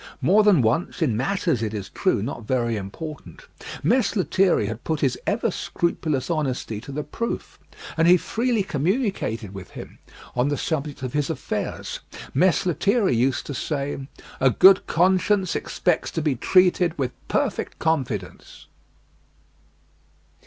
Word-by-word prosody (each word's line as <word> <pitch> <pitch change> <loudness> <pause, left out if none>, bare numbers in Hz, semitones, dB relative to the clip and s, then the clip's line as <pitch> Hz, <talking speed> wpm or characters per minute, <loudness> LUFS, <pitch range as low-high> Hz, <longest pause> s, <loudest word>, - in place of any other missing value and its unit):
More 205 +4 +4
than 200 - +5
once 130 +9 0
in 125 -8 +1
matters, 160 - 0
it 110 -1 -2
is 100 -2 -5
true, 155 - 0
not 115 -3 -6
very 120 -2 0
important 150 - -7 0.4
Mess 250 -4 +2
Lethierry 185 - +2
had 110 +3 -5
put 160 -2 -2
his 130 -3 +2
ever 225 +1 +1
scrupulous 160 -6 -2
honesty 135 -9 -2
to 140 - -9
the 150 +2 -3
proof; 230 +11 -5 0.4
and 165 +1 +3
he 180 +1 +7
freely 230 +3 0
communicated 155 - -1
with 95 -2 -9
him - - -10 0.4
on 125 +3 +2
the 145 - -1
subject 145 -3 -3
of 130 - -4
his 145 -1 0
affairs. 160 - -4 0.3
Mess 185 +5 +3
Lethierry 185 - +2
used 130 +3 +1
to 145 - -5
say, 140 -1 -3 0.3
"A 135 - +5
good 190 - +6
conscience 185 +2 +2
expects 180 -3 0
to 165 - -1
be 150 -3 +2
treated 180 +5 +3
with 130 -3 -1 0.2
perfect - - -1
confidence." 130 - -3
155 Hz, 145 wpm, -24 LUFS, 125-185 Hz, 0.4 s, he